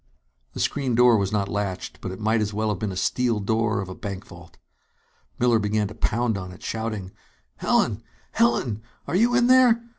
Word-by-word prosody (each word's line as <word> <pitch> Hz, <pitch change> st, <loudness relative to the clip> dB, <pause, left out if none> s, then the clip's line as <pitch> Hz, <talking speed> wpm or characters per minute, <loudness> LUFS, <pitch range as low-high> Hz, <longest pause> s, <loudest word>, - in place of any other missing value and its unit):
The -, -, -7 dB
screen 130 Hz, -4 st, 0 dB
door 125 Hz, 0 st, +6 dB
was 100 Hz, -3 st, 0 dB
not 100 Hz, -2 st, 0 dB
latched, 100 Hz, -2 st, -4 dB
but -, -, -4 dB
it 95 Hz, -, -8 dB
might 110 Hz, +1 st, +1 dB
as 105 Hz, -1 st, -2 dB
well 110 Hz, 0 st, 0 dB
have 105 Hz, -4 st, -2 dB
been 105 Hz, -, -2 dB
the 95 Hz, -, -5 dB
steel 120 Hz, +2 st, +1 dB
door 110 Hz, 0 st, 0 dB
of 95 Hz, -, -6 dB
a 95 Hz, -, -6 dB
bank 100 Hz, 0 st, -6 dB
vault. 85 Hz, -1 st, -14 dB, 0.8 s
Miller 120 Hz, -2 st, +3 dB
began 105 Hz, 0 st, 0 dB
to -, -, -9 dB
pound 115 Hz, -2 st, 0 dB
on 90 Hz, -1 st, -7 dB
it, 90 Hz, -, -13 dB
shouting: 110 Hz, -4 st, -4 dB, 0.5 s
"Helen! -, -, +1 dB, 0.3 s
Helen, 115 Hz, -2 st, +1 dB, 0.2 s
are -, -, -3 dB
you 235 Hz, +5 st, +3 dB
in 245 Hz, -1 st, +4 dB
there? 250 Hz, -2 st, +6 dB
110 Hz, 200 wpm, -24 LUFS, 100-120 Hz, 0.8 s, door